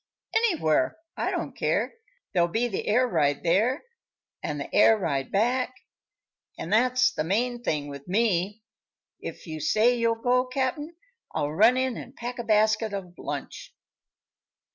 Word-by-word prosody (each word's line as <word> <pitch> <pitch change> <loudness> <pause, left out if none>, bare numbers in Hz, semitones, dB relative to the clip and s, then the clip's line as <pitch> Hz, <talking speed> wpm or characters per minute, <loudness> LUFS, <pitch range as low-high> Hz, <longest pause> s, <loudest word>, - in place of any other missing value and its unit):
"Anywhere; 320 - +2 0.2
I - - -1
don't - - -3
care. - - 0 0.4
There'll 175 -2 +3
be 230 +7 0
the 200 - -4
air 250 +4 +3
ride 145 - +1
there, 220 - +2 0.6
an' 150 - -3
the 140 - -6
air 220 +2 +6
ride 140 -9 -2
back, 250 +5 +1 0.8
an' 170 - -6
that's 255 +3 +4
the 155 - -2
main 240 +8 0
thing 150 -10 -1
with 140 +1 -9
me. 205 0 0 0.6
If - - -8
you 155 -2 -6
say 220 +10 +3
you'll 230 -1 +1
go, 250 +1 +3
Cap'n, 275 +5 -2 0.4
I'll 145 - 0
run 220 +10 +5
in 260 -2 0
an' 250 - -9
pack 245 -1 -6
a - - -2
basket 215 0 +2
of 180 -3 -7
lunch." - - -6
220 Hz, 150 wpm, -26 LUFS, 175-250 Hz, 0.8 s, air